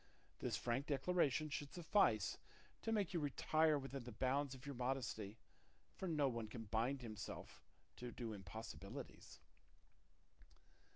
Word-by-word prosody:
This - - 0
frank 125 +4 0
declaration 155 0 +3
should 145 0 -3
suffice 160 - +3 0.4
to 225 - 0
make 205 -5 +2
you 170 - +2
retire 155 +1 +4
within 135 -1 -4
the 120 - -6
bounds 135 +4 +1
of 130 +2 -11
your 140 - -3
modesty, 125 -5 -1 0.6
for 190 - -3
no 150 -4 +3
one 115 -3 -1
can 115 +1 -5
bind 120 +5 +1
himself 110 -3 -6 0.4
to 125 0 -4
do 115 -2 -3
impossibilities." 110 +3 -7
135 Hz, 130 wpm, -43 LUFS, 115-150 Hz, 0.6 s, retire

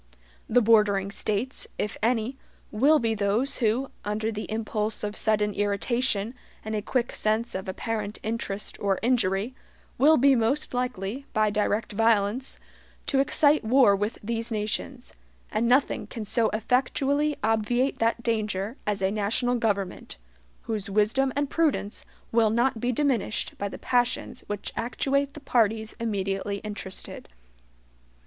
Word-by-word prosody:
The 245 +1 +4
bordering 205 -3 +4
States, 215 +6 -2
if 210 - -2
any, 230 +2 +1 0.4
will 280 +9 +5
be 230 -4 0
those 215 +6 +1
who, 245 +3 0
under 215 +2 -1
the 215 0 -5
impulse 215 -1 -1
of 210 0 -3
sudden 210 -2 +1
irritation, 205 +2 0 0.3
and 220 - -3
a 210 - 0
quick 240 +3 -1
sense 220 +2 0
of 190 0 -4
apparent 210 +1 -3
interest 215 -2 -4
or 195 -2 +1
injury, 225 -2 +1 0.5
will 310 +4 +6
be 275 +2 +5
most 255 +5 +1
likely, 250 +1 -3
by 215 -1 +2
direct 210 +1 0
violence, 225 +3 +1 0.5
to 275 - +1
excite 290 +1 +3
war 235 -2 +5
with 210 +4 -2
these 230 +1 -2
nations; 225 +4 -3 0.4
and 225 +2 +1
nothing 255 +4 +2
can 225 -3 -6
so 220 +2 +2
effectually 270 +6 +1
obviate 225 +4 +1
that 230 +1 +1
danger 215 0 -1
as 205 -2 -1
a 190 - +2
national 215 +4 0
government, 205 - -2 0.5
whose 210 -3 -3
wisdom 215 +7 +2
and 285 0 -1
prudence 300 -10 0 0.2
will 225 -1 +4
not 235 +2 +1
be 245 - +1
diminished 250 -5 0
by 200 - -2
the - - -8
passions 245 -1 0
which 205 -1 -5
actuate 275 +4 -1
the - - -7
parties 220 -5 +1
immediately 200 -3 -2
interested. 205 -3 -6
225 Hz, 140 wpm, -26 LUFS, 210-250 Hz, 0.5 s, will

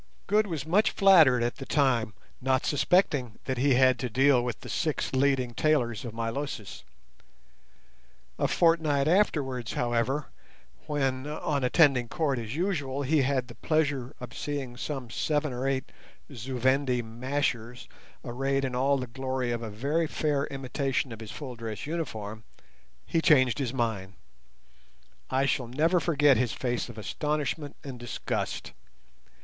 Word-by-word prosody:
Good 210 +1 +2
was 160 -6 -4
much 190 +7 +3
flattered 160 - +6
at 120 - -2
the 135 - -7
time, 130 -7 +1 0.3
not 130 0 +1
suspecting 145 - +2
that 130 -2 -2
he 135 0 +4
had 130 -1 +4
to 125 0 -2
deal 130 +1 +4
with 120 -2 -4
the - - -9
six 155 -5 -1
leading 130 -2 +2
tailors 120 -5 +1
of 120 - -5
Milosis. 115 -2 -4 1.6
A - - +2
fortnight 160 -4 +2
afterwards, 140 - +1
however, 120 +4 0 0.6
when 135 -2 -1
on 150 -2 -2
attending 130 -3 +4
court 145 -3 -1
as 115 +2 -5
usual 145 -6 -1
he 150 +2 +3
had 130 -2 0
the 120 - -10
pleasure 145 -3 -1
of 125 -2 -9
seeing 140 -4 -4
some 130 -2 -5
seven 150 +1 0
or 125 +2 -2
eight 135 -1 -1 0.4
Zu 130 +1 -5
Vendi 130 0 +2
"mashers" 125 0 -3 0.4
arrayed 135 +3 -1
in 130 - -3
all 135 +3 +2
the 130 - -3
glory 130 0 -3
of 120 -1 -2
a 115 - -5
very 145 +10 0
fair 145 -2 0
imitation 135 -1 -2
of 115 - -8
his 110 -2 -8
full 130 -1 -7
dress 115 -1 -6
uniform, 110 -10 -5 0.6
he 165 - 0
changed 130 -8 +4
his 130 -4 -1
mind. 110 -7 -2 1.2
I 135 +1 +2
shall 130 -3 0
never 160 +9 +2
forget 145 -5 +4
his 120 0 0
face 125 -1 -2
of 115 - -10
astonishment 145 +4 -2
and 130 -3 -7
disgust. 120 -1 -4
130 Hz, 150 wpm, -28 LUFS, 120-145 Hz, 1.6 s, flattered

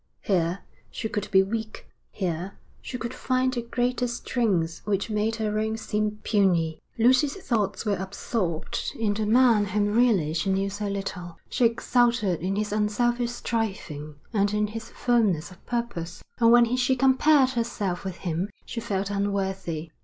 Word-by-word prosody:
Here 180 -1 0 0.3
she 220 - -4
could 205 -1 -3
be 190 -1 +5
weak, 215 +2 -5 0.2
here 180 0 -3 0.2
she 250 - -5
could 235 +1 -5
find 255 0 0
a 240 - -1
greater 245 +1 -1
strength 215 -8 -1
which 205 +1 -1
made 215 +1 0
her 215 -1 -1
own 220 +1 -1
seem 210 -1 -1
puny. 175 -7 +2 0.2
Lucy's 255 +5 +4
thoughts 230 - -1
were 205 -2 +1
absorbed 190 -2 -3
in 215 -2 +1
the 210 0 -2
man 230 -2 +5
whom 205 +1 0
really 215 -10 +3
she 170 +4 -1
knew 195 +1 0
so 205 +1 -3
little. 190 -3 -5
She 250 - +2
exulted 235 -4 +2
in 190 +3 -1
his 210 0 -1
unselfish 235 +3 +1
striving 190 -11 -3 0.2
and 205 -1 +2
in 210 0 +2
his 225 +2 -7
firmness 210 -9 +1
of 185 - -16
purpose, 235 -9 -3 0.2
and 230 -1 +6
when 240 0 +5
she 255 +1 +2
compared 265 +1 +4
herself 230 -7 -2
with 190 -2 -4
him 175 +2 -2 0.2
she 235 - -5
felt 200 -2 -2
unworthy. 190 -5 -2
210 Hz, 160 wpm, -26 LUFS, 190-235 Hz, 0.3 s, and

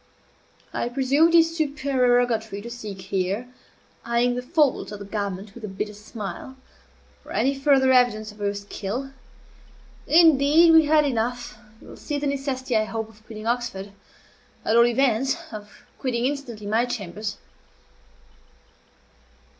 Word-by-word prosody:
"I 240 - -2
presume 275 +5 +3
it 335 - +2
is 330 0 +4
supererogatory 245 - +1
to 235 - -7
seek 215 -5 -7
here" 195 +4 -2 0.6
(eying 235 +1 +1
the 250 - -3
folds 290 - +1
of 210 - -6
the 200 - -9
garment 200 -1 -4
with 240 - -12
a - - -3
bitter 205 +2 -5
smile) 210 +3 -8 0.6
"for - - -14
any 275 - +1
farther 275 -1 +3
evidence 230 -4 +3
of 210 - -18
your 205 0 -1
skill. 205 +6 -5 1.0
Indeed, 320 0 +6
we 320 -1 +7
have 305 0 +5
had - - -1
enough. 240 -3 -2 0.2
You - - -15
will - - -11
see 295 - -4
the 290 - -3
necessity, 270 -3 -2
I 215 0 +3
hope, 220 0 -4
of 215 -1 -20
quitting 215 -1 -8
Oxford 235 -5 -2 0.7
at 220 - +2
all 235 0 +6
events, 260 +2 +1
of 210 -2 -11
quitting 245 -2 -1
instantly 255 -6 -4
my 220 +4 +1
chambers." 205 -2 -5
240 Hz, 145 wpm, -24 LUFS, 215-275 Hz, 1.0 s, we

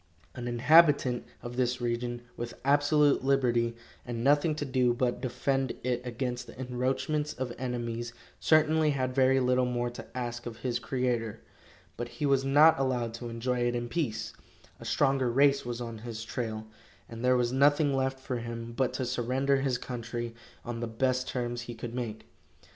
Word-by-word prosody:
An 120 -1 -6
inhabitant 135 0 +4 0.2
of 120 +1 -6
this 125 0 +1
region, 120 0 -2
with 120 0 -5
absolute 145 0 +4
liberty, 120 -4 +2 0.3
and 120 -1 -4
nothing 145 +3 +3
to 150 - -3
do 125 -2 +2
but 125 -1 0
defend 135 +1 0
it 125 -1 0
against 125 0 -3
the - - -12
encroachments 130 +4 -1
of 125 -2 -4
enemies, 120 -2 -3 0.3
certainly 155 0 +4
had 130 -3 0
very 135 0 +4
little 125 0 +2
more 120 0 -1
to 120 - -9
ask 120 -1 -4
of 115 -2 -7
his 120 -1 0
Creator. 120 -3 -1 0.6
But 120 - -3
he 150 - -1
was 135 -1 +3
not 145 +3 +6
allowed 125 -4 0
to 120 +1 -6
enjoy 125 +2 -2
it 120 0 +1
in 120 0 -3
peace. 125 -10 -2 0.5
A - - -10
stronger 135 -3 +2
race 140 +1 +3
was 120 0 -3
on 115 -2 -6
his 115 0 -6
trail, 110 -2 -4 0.4
and 115 +1 -8
there 125 0 +4
was 120 -1 +1
nothing 145 +2 +4
left 135 0 0
for 130 -1 -3
him 115 0 -6
but 130 -1 +1
to 130 0 -2
surrender 130 +3 +1
his 135 -2 0
country 120 -1 -5 0.3
on 120 -1 -4
the 120 - -2
best 130 +3 0
terms 120 -1 -3
he 120 0 -7
could 115 0 -6
make. 120 -3 -4
125 Hz, 175 wpm, -29 LUFS, 120-135 Hz, 0.6 s, not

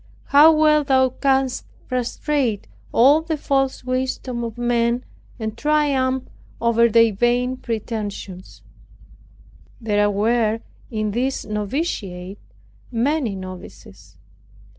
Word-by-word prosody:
How 295 +3 +8
well 305 -1 +4
Thou 260 -2 +3
canst 265 0 0 0.2
frustrate 255 -2 -1 0.3
all 280 +6 +5
the 320 -1 -3
false 270 -2 0
wisdom 255 -1 -2
of 230 0 -6
men, 240 0 0 0.3
and 220 -2 -4
triumph 270 -3 +1 0.4
over 235 0 +3
their 230 0 +4
vain 245 +4 +1
pretensions! 210 -6 -6 1.2
There 205 -2 +1
were 220 +2 +1 0.3
in 215 -2 -2
this 255 +5 -2
noviciate 205 - -4 0.5
many 245 -1 0
novices. 185 - -11
240 Hz, 95 wpm, -21 LUFS, 215-265 Hz, 1.2 s, How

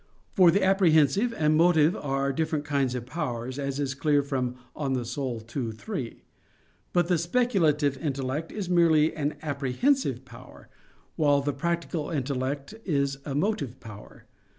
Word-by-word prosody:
For 185 -3 +6
the 190 +4 +3
apprehensive 190 - +4
and 155 0 +3
motive 160 -1 +4
are 135 0 -1
different 155 0 -1
kinds 140 -4 0
of 120 -1 -4
powers, 130 -4 -4
as 140 0 -3
is 140 -2 -1
clear 145 0 +2
from 130 -3 -2 0.2
De - - -14
Anima 130 -4 -1
ii, 120 -2 -4
3. 130 - -6 0.7
But 175 -1 +2
the 175 -2 +2
speculative 165 - +1
intellect 140 +1 -3
is 205 -4 -4
merely 165 -3 +3
an 150 -1 -2
apprehensive 150 - 0
power; - - -14 0.5
while 145 -3 +3
the 145 +1 -1
practical 170 -2 -2
intellect 140 0 -3
is 140 -5 0
a 140 - -4
motive 150 - -1
power. 105 -4 -12
145 Hz, 145 wpm, -27 LUFS, 135-170 Hz, 0.7 s, For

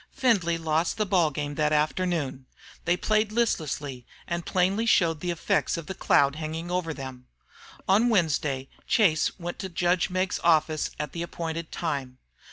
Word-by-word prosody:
Findlay 205 -11 +2
lost 160 +4 0
the 215 - +1
ball 180 -5 +3
game 145 0 -4
that 150 0 +1
afternoon. 150 -4 0 0.4
They 175 +1 +2
played 215 +2 +1
listlessly, 150 - -1 0.2
and 170 0 -2
plainly 195 +5 +1
showed 165 -7 +3
the 180 - -3
effects 170 0 0
of 165 - -6
the 190 - -5
cloud 140 -5 +3
hanging 160 +2 -4
over 180 -2 -1
them. 130 -3 -8 0.6
On 215 +6 +4
Wednesday 150 - +1 0.2
Chase 170 -9 +3
went 175 -1 -6
to 190 - -4
judge 175 0 +1
Meggs's 185 +1 -1
office 155 -2 +3
at 150 -2 -3
the 170 - -5
appointed 165 -1 -4
time. 140 -6 -3
165 Hz, 160 wpm, -27 LUFS, 150-185 Hz, 0.6 s, On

